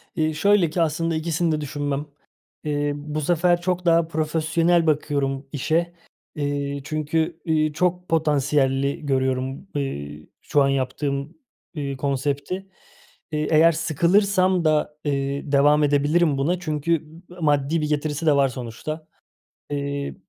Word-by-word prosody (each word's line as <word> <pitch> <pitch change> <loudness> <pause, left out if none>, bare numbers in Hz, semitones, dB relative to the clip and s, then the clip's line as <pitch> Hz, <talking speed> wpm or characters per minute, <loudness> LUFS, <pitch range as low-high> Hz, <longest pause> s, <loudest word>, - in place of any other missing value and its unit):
Eee, 155 0 +1
şöyle 190 +2 +3
ki 170 +2 -1
aslında 165 +1 0
ikisini 165 +1 0
de 155 -1 -1
düşünmem. 145 0 -3 0.6
Eee, 145 -1 -1
bu 150 +1 -4
sefer 175 +2 +2
çok 180 0 -1
daha 165 -1 +4
profesyonel 165 +2 +1
bakıyorum 140 -2 0
işe. 165 +4 0 0.4
Eee, 140 -1 -2
çünkü, 160 +2 -1
eee, 155 -2 +1
çok 180 +2 -1
potansiyelli 140 -3 +1
görüyorum, 130 +3 -1
eee, 75 - -4
şu 145 - +2
an 135 - +2
yaptığım, 140 - -2 0.4
eee, 140 -3 -3
konsepti. 140 +7 -2 0.6
Eee, 150 0 -1
eğer 160 +2 +6
sıkılırsam 185 +3 +2
da, 150 -1 +1
eee, 140 0 -2
devam 145 +2 +4
edebilirim 145 +1 +2
buna 170 +6 0
çünkü 155 -1 -1 0.4
m 180 - -13
maddi 150 +1 +2
bir 150 - -1
getirisi 150 +1 -1
de 150 -3 +5
var 140 -1 +4
sonuçta. 130 +6 -6 0.6
Eee, 140 0 -3
150 Hz, 130 wpm, -23 LUFS, 140-165 Hz, 0.6 s, eğer